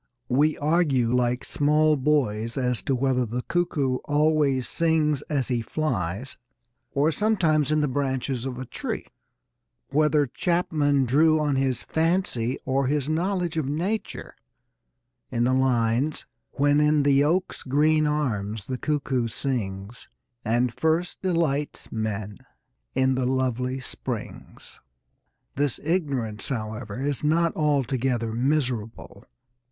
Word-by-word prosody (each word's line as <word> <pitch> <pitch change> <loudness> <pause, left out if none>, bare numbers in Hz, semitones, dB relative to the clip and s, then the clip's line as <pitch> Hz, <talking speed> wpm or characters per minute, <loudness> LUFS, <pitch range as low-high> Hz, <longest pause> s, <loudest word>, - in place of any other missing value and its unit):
We 150 +5 +2
argue 145 -6 +2
like 125 0 +1
small 150 +1 +3
boys 130 -6 0
as 125 -2 0
to 135 - +1
whether 130 0 +1
the 120 +2 -3
cuckoo 145 -7 0
always 145 -3 +2
sings 155 -4 +1
as 135 -4 -1
he 120 -2 0
flies 115 - -3 0.5
or 145 +3 +2
sometimes 160 -6 +1
in 155 0 +3
the 150 - +1
branches 130 -2 -2
of 125 -2 -5
a 130 - -5
tree - - -5 0.8
whether 150 0 +3
Chapman 145 -2 +1
drew 155 +5 +4
on 145 -2 +1
his 130 -2 0
fancy 160 -8 0
or 135 0 +1
his 145 0 0
knowledge 175 +1 -1
of 145 -4 -1
nature 190 +9 -3 1.0
in 120 - 0
the 125 +2 +2
lines: 130 +2 +1 0.3
When 145 +1 +3
in 150 -1 +3
the 140 0 +4
oak's 175 +5 0
green 155 +3 +2
arms 110 -9 -2
the 130 -1 -4
cuckoo 135 -5 0
sings, 110 -4 -4 0.3
And 120 +1 +1
first 160 +5 0
delights 165 -6 -1
men 105 -2 -3 0.6
in 130 0 +3
the 130 -1 0
lovely 130 0 -1
springs. 130 - -7 0.7
This 140 -2 -1
ignorance, 140 - -1
however, 110 -3 -4
is 140 +1 -2
not 165 +2 +2
altogether 130 -5 0
miserable. 125 -3 -2
135 Hz, 125 wpm, -25 LUFS, 125-155 Hz, 1.0 s, drew